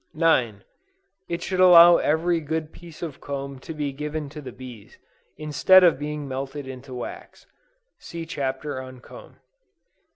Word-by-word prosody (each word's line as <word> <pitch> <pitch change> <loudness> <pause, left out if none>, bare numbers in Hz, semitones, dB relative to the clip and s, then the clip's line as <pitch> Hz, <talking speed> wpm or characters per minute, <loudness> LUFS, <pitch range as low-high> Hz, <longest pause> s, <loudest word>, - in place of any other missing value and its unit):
9. 125 -11 +1 0.7
It 170 0 -3
should 185 -1 -3
allow 175 -1 +8
every 165 +3 +1
good 160 0 -4
piece 170 -1 -12
of 150 -5 -7
comb 140 -1 -6
to 150 - -9
be 150 -3 -3
given 150 +1 -5
to 150 +1 -9
the 130 -3 -8
bees, 120 -4 -12 0.4
instead 155 +5 +5
of 170 -6 +4
being 150 -1 -5
melted 135 +1 -5
into 130 0 -9
wax. 125 - -9 0.5
(See 170 -1 -8
Chapter 135 -2 -4
on 130 -1 -11
Comb.) - - -14
150 Hz, 150 wpm, -24 LUFS, 130-165 Hz, 0.7 s, allow